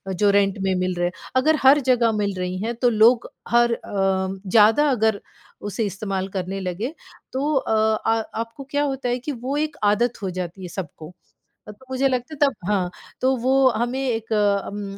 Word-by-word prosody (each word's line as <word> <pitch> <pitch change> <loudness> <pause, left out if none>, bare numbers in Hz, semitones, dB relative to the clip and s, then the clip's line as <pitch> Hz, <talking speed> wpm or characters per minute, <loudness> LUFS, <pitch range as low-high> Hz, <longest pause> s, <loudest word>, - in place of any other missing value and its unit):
जो 205 +3 +3
रेंट 200 0 +2
में 190 0 +1
मिल 185 0 -1
रहे 175 0 0
है। - - -3 0.2
अगर 310 +5 +4
हर 270 +2 +7
जगह 240 -2 +4
मिल 205 -2 -1
रही 180 0 -3
हैं 235 +2 -2
तो 245 +1 +2
लोग 230 +2 +4 0.2
हर 235 0 +4
अ, - - -4 0.7
ज़्यादा 225 +9 +5
अगर 220 -4 +1 0.5
उसे 220 +2 -2
इस्तेमाल 195 -1 -3
करने 190 +1 -3
लगे, 195 - -4 0.4
तो 285 +4 0
अ 265 - 0 0.3
आ 225 0 +3 0.2
आपको 230 +4 -8
क्या 290 0 +1
होता 270 -3 -2
है 245 +1 0
कि 275 +5 -5
वो 260 +2 -4
एक 300 -1 -2
आदत 220 +3 +1
हो 190 - -1
जाती 180 +1 -6
है 180 - -6
सबको। 170 -2 -8 0.6
अ, - - -6
तो 210 +5 -15
मुझे 260 +1 +1
लगता 255 +3 -3
है 290 - -13
तब 275 - -6
हाँ, 190 -4 +1 0.3
तो 260 +1 +2
वो 260 +2 +3
हमें 240 +3 -2
एक 230 -4 -2
अम 200 -1 -1
225 Hz, 195 wpm, -22 LUFS, 195-260 Hz, 0.7 s, हर